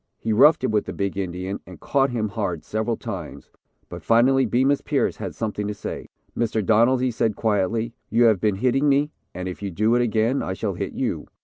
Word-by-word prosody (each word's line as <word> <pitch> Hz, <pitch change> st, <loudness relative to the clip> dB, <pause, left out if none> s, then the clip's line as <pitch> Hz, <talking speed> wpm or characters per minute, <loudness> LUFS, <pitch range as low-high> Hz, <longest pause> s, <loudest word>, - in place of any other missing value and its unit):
He 110 Hz, -, -2 dB
roughed 150 Hz, +7 st, +5 dB
it 130 Hz, -, +1 dB
with 105 Hz, -1 st, +1 dB
the -, -, -6 dB
big 100 Hz, -1 st, -2 dB
Indian 95 Hz, 0 st, -4 dB
and 90 Hz, -1 st, -11 dB
caught 135 Hz, -1 st, +1 dB
him 110 Hz, -3 st, -2 dB
hard 85 Hz, -4 st, -3 dB
several 110 Hz, +2 st, -2 dB
times, -, -, -7 dB, 0.4 s
but -, -, -8 dB
finally 130 Hz, +3 st, +4 dB
Bemus 135 Hz, +5 st, +2 dB
Pierce -, -, 0 dB
had -, -, -6 dB
something 105 Hz, -2 st, -3 dB
to 105 Hz, -, -4 dB
say. -, -, -6 dB, 0.3 s
"Mr. 110 Hz, -3 st, -1 dB
Donald," 120 Hz, +4 st, +4 dB
he 130 Hz, -, +1 dB
said, 110 Hz, -2 st, 0 dB
quietly, 110 Hz, +2 st, 0 dB, 0.2 s
"you 115 Hz, +2 st, +3 dB
have 110 Hz, -5 st, +4 dB
been 105 Hz, -2 st, +2 dB
hitting 130 Hz, +7 st, +2 dB
me 145 Hz, +2 st, +2 dB, 0.2 s
and 90 Hz, +1 st, -4 dB
if 90 Hz, -, -6 dB
you 100 Hz, -, -3 dB
do 110 Hz, +6 st, +1 dB
it 120 Hz, -, +3 dB
again, 115 Hz, +3 st, +1 dB
I 95 Hz, -, -3 dB
shall 95 Hz, -, -3 dB
hit -, -, -4 dB
you." -, -, -3 dB
110 Hz, 215 wpm, -23 LUFS, 100-125 Hz, 0.4 s, roughed